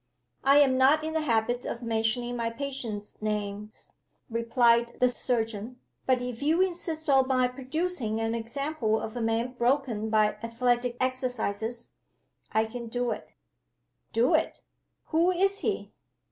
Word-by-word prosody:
"I 275 Hz, +1 st, +6 dB
am 265 Hz, -3 st, +5 dB
not 285 Hz, +4 st, +5 dB
in 315 Hz, 0 st, -3 dB
the 320 Hz, -, +1 dB
habit 240 Hz, -2 st, 0 dB
of 235 Hz, -, -5 dB
mentioning 230 Hz, +2 st, 0 dB
my 230 Hz, -1 st, -1 dB
patients' 230 Hz, -6 st, -5 dB
names," 210 Hz, 0 st, -4 dB, 0.4 s
replied 235 Hz, 0 st, +2 dB
the 250 Hz, -, +5 dB
surgeon. 235 Hz, -1 st, -2 dB, 0.3 s
"But 255 Hz, -1 st, +2 dB
if 245 Hz, -1 st, -5 dB
you 310 Hz, +4 st, +2 dB
insist 340 Hz, -4 st, 0 dB
on 270 Hz, -2 st, +4 dB
my 255 Hz, -1 st, +3 dB
producing 260 Hz, -2 st, -2 dB
an 225 Hz, 0 st, -1 dB
example 235 Hz, 0 st, -1 dB
of 220 Hz, -, -6 dB
a 240 Hz, -, -3 dB
man 225 Hz, +2 st, 0 dB
broken 240 Hz, -3 st, 0 dB
by 215 Hz, -1 st, +2 dB
athletic 240 Hz, +1 st, 0 dB
exercises, 245 Hz, -3 st, -2 dB, 0.6 s
I 220 Hz, 0 st, +2 dB
can 235 Hz, +1 st, -7 dB
do 245 Hz, +1 st, -1 dB
it." -, -, -7 dB, 0.8 s
"Do 235 Hz, +2 st, +3 dB
it! -, -, 0 dB, 0.5 s
Who 335 Hz, +2 st, +3 dB
is 390 Hz, +2 st, +2 dB
he?" -, -, -2 dB
245 Hz, 145 wpm, -28 LUFS, 225-270 Hz, 0.8 s, I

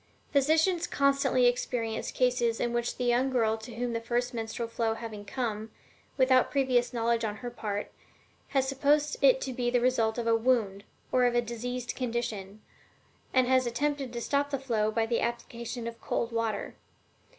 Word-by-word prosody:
Physicians 320 Hz, +5 st, +3 dB
constantly 275 Hz, -2 st, +2 dB
experience 245 Hz, -2 st, 0 dB
cases 245 Hz, -2 st, +1 dB
in 240 Hz, -, -1 dB
which 240 Hz, 0 st, -1 dB
the 250 Hz, -, -2 dB
young 245 Hz, +2 st, +2 dB
girl 225 Hz, -4 st, +2 dB
to 220 Hz, +1 st, -10 dB
whom 240 Hz, 0 st, -2 dB
the 230 Hz, -, -2 dB
first 245 Hz, +2 st, -1 dB
menstrual 230 Hz, 0 st, -3 dB
flow 230 Hz, -1 st, -1 dB
having 220 Hz, -3 st, -7 dB
come, 220 Hz, -1 st, -3 dB, 0.5 s
without 260 Hz, -1 st, +4 dB
previous 255 Hz, -3 st, +2 dB
knowledge 235 Hz, -1 st, 0 dB
on 210 Hz, -2 st, -2 dB
her 245 Hz, +2 st, -6 dB
part, 210 Hz, -3 st, -4 dB, 0.6 s
has 270 Hz, -1 st, +1 dB
supposed 290 Hz, +2 st, +2 dB
it -, -, +6 dB
to 260 Hz, -, -3 dB
be 245 Hz, 0 st, 0 dB
the 245 Hz, 0 st, +2 dB
result 235 Hz, -2 st, +1 dB
of 235 Hz, -, -2 dB
a 230 Hz, 0 st, +4 dB
wound, 220 Hz, -4 st, +1 dB, 0.3 s
or 250 Hz, -1 st, +4 dB
of 240 Hz, 0 st, +2 dB
a -, -, +5 dB
diseased 240 Hz, +1 st, -4 dB
condition, 220 Hz, -5 st, -4 dB, 0.7 s
and 255 Hz, -1 st, +4 dB
has 255 Hz, -1 st, +3 dB
attempted 275 Hz, +2 st, -1 dB
to 235 Hz, -1 st, -5 dB
stop 285 Hz, +3 st, 0 dB
the 280 Hz, -, -1 dB
flow 230 Hz, -5 st, 0 dB
by 225 Hz, +1 st, +1 dB
the 230 Hz, +1 st, 0 dB
application 235 Hz, 0 st, -4 dB
of 230 Hz, 0 st, -7 dB
cold 235 Hz, -, -2 dB
water. 230 Hz, -3 st, -2 dB
240 Hz, 175 wpm, -29 LUFS, 230-255 Hz, 0.7 s, it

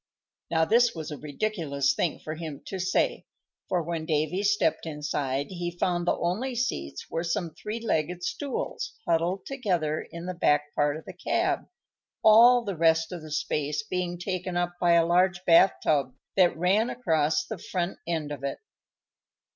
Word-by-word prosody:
Now, 160 Hz, -1 st, +2 dB
this 235 Hz, +3 st, +4 dB
was 160 Hz, -1 st, -6 dB
a 150 Hz, -, -5 dB
ridiculous 145 Hz, -4 st, -1 dB
thing 160 Hz, +2 st, -1 dB
for 155 Hz, -, -5 dB
him 155 Hz, -3 st, -7 dB
to 190 Hz, -, -5 dB
say, 185 Hz, +1 st, 0 dB, 0.4 s
for 175 Hz, -2 st, +1 dB
when 160 Hz, -1 st, -4 dB
Davy 155 Hz, +4 st, 0 dB
stepped 205 Hz, -4 st, +1 dB
inside 145 Hz, -2 st, -2 dB
he 175 Hz, -1 st, -3 dB
found 175 Hz, -1 st, 0 dB
the -, -, +3 dB
only 220 Hz, +10 st, -1 dB
seats 70 Hz, -, -3 dB
were 165 Hz, -, -1 dB
some 170 Hz, -1 st, -2 dB
three 215 Hz, +2 st, -5 dB
legged 180 Hz, -5 st, -1 dB
stools 280 Hz, -, -4 dB
huddled 175 Hz, +4 st, +1 dB
together 180 Hz, -, -1 dB
in 170 Hz, +1 st, -9 dB
the 185 Hz, -, -3 dB
back 145 Hz, -4 st, +1 dB
part 145 Hz, 0 st, +1 dB
of 160 Hz, -, -11 dB
the 190 Hz, -, -8 dB
cab, 345 Hz, -, -1 dB, 0.6 s
all 235 Hz, +3 st, +7 dB
the 200 Hz, -4 st, -3 dB
rest 165 Hz, 0 st, +3 dB
of 175 Hz, -2 st, -6 dB
the 155 Hz, -, -10 dB
space 150 Hz, +2 st, -1 dB
being 180 Hz, -4 st, -3 dB
taken 180 Hz, 0 st, -3 dB
up 175 Hz, 0 st, 0 dB
by 175 Hz, -1 st, +5 dB
a 170 Hz, -1 st, +5 dB
large 180 Hz, +1 st, +2 dB
bath 175 Hz, +3 st, +6 dB
tub 140 Hz, -4 st, +1 dB, 0.2 s
that 180 Hz, -4 st, +4 dB
ran 195 Hz, +7 st, +2 dB
across 160 Hz, -9 st, +1 dB
the 220 Hz, -5 st, -6 dB
front 180 Hz, +1 st, -3 dB
end 160 Hz, -3 st, -2 dB
of 140 Hz, -2 st, -6 dB
it. 140 Hz, -, -2 dB
175 Hz, 170 wpm, -27 LUFS, 155-190 Hz, 0.6 s, all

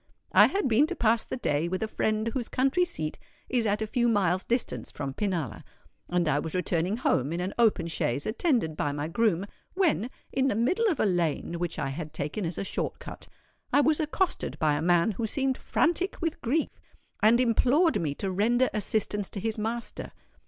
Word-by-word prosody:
I -, -, +7 dB
had 395 Hz, -6 st, 0 dB
been 255 Hz, +6 st, +4 dB
to -, -, -4 dB
pass 225 Hz, 0 st, +2 dB
the -, -, -5 dB
day 150 Hz, -, 0 dB
with 185 Hz, +4 st, -2 dB
a -, -, -1 dB
friend 215 Hz, +1 st, 0 dB
whose 245 Hz, 0 st, -3 dB
country 270 Hz, +8 st, +2 dB
seat 155 Hz, -, -4 dB, 0.3 s
is 240 Hz, -3 st, +1 dB
at 210 Hz, +1 st, 0 dB
a -, -, -1 dB
few 240 Hz, +2 st, +1 dB
miles' 190 Hz, -5 st, +2 dB
distance 240 Hz, 0 st, -2 dB
from 140 Hz, -2 st, -5 dB
Pinalla; 165 Hz, -, -2 dB, 0.5 s
and 175 Hz, -2 st, +1 dB
I 145 Hz, -1 st, +2 dB
was 160 Hz, +2 st, -4 dB
returning 180 Hz, +2 st, 0 dB
home 145 Hz, -, +1 dB
in 170 Hz, -, -2 dB
an 185 Hz, +2 st, -3 dB
open 215 Hz, -7 st, +3 dB
chaise, 145 Hz, -5 st, -1 dB
attended 225 Hz, -, 0 dB
by 145 Hz, -1 st, -1 dB
my 145 Hz, +1 st, -3 dB
groom, 195 Hz, 0 st, +1 dB, 0.3 s
when, 320 Hz, -, +1 dB, 0.2 s
in 270 Hz, 0 st, +2 dB
the 235 Hz, -, +1 dB
middle 360 Hz, -, +2 dB
of 325 Hz, -, -3 dB
a -, -, +3 dB
lane 170 Hz, -2 st, 0 dB
which 175 Hz, -2 st, -3 dB
I 135 Hz, -, -2 dB
had 155 Hz, +2 st, -6 dB
taken 155 Hz, +5 st, -3 dB
as 165 Hz, -, -5 dB
a -, -, -2 dB
short 195 Hz, -, -3 dB
cut, -, -, -10 dB, 0.4 s
I 285 Hz, -, +5 dB
was 305 Hz, +1 st, +2 dB
accosted 330 Hz, +4 st, -1 dB
by 155 Hz, -1 st, +2 dB
a 145 Hz, -, -1 dB
man 175 Hz, +4 st, +3 dB
who 225 Hz, +3 st, -3 dB
seemed 270 Hz, +3 st, 0 dB
frantic 345 Hz, +3 st, 0 dB
with 330 Hz, -2 st, -2 dB
grief, 290 Hz, +7 st, -1 dB, 0.4 s
and 225 Hz, +3 st, +5 dB
implored 255 Hz, -, +3 dB
me 145 Hz, -3 st, -2 dB
to 195 Hz, +4 st, -3 dB
render 235 Hz, +7 st, +2 dB
assistance 210 Hz, -1 st, -1 dB
to 200 Hz, -, -6 dB
his 220 Hz, +2 st, -2 dB
master. 230 Hz, +2 st, -4 dB
215 Hz, 200 wpm, -28 LUFS, 170-250 Hz, 0.5 s, I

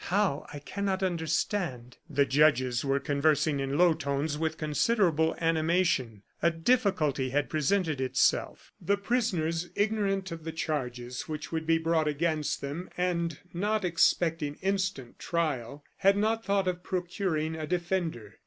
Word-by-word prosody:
How, 190 Hz, -6 st, 0 dB
I 145 Hz, -, -7 dB
cannot 195 Hz, +6 st, -2 dB
understand." 160 Hz, -, -1 dB
The 140 Hz, -, +3 dB
judges 130 Hz, -3 st, +3 dB
were 140 Hz, 0 st, +1 dB
conversing 145 Hz, +1 st, +1 dB
in 135 Hz, +1 st, -1 dB
low 175 Hz, -1 st, +5 dB
tones 145 Hz, 0 st, -2 dB
with 160 Hz, +1 st, -2 dB
considerable 160 Hz, -, +2 dB
animation. 160 Hz, -, +1 dB, 0.2 s
A 170 Hz, -, +4 dB
difficulty 165 Hz, -, +1 dB
had 145 Hz, +3 st, -1 dB
presented 155 Hz, -1 st, +1 dB
itself. 130 Hz, -, +1 dB
The 200 Hz, 0 st, +1 dB
prisoners, 180 Hz, -7 st, -1 dB
ignorant 200 Hz, -3 st, 0 dB
of 165 Hz, -1 st, -7 dB
the 160 Hz, 0 st, -5 dB
charges 125 Hz, -6 st, -3 dB
which 155 Hz, -2 st, -5 dB
would 160 Hz, -1 st, -3 dB
be 165 Hz, 0 st, +4 dB
brought 165 Hz, -1 st, +1 dB
against 155 Hz, 0 st, -1 dB
them, 145 Hz, +6 st, -5 dB
and 170 Hz, -3 st, 0 dB, 0.2 s
not 205 Hz, +3 st, 0 dB
expecting 165 Hz, -3 st, +2 dB
instant 190 Hz, -10 st, -2 dB
trial, 145 Hz, -5 st, -2 dB
had 195 Hz, 0 st, +4 dB
not 220 Hz, +2 st, +1 dB
thought 200 Hz, -2 st, +1 dB
of 180 Hz, -1 st, -1 dB
procuring 175 Hz, -3 st, -2 dB
a 155 Hz, -1 st, -5 dB
defender. 170 Hz, -, -2 dB
160 Hz, 140 wpm, -29 LUFS, 145-185 Hz, 0.2 s, low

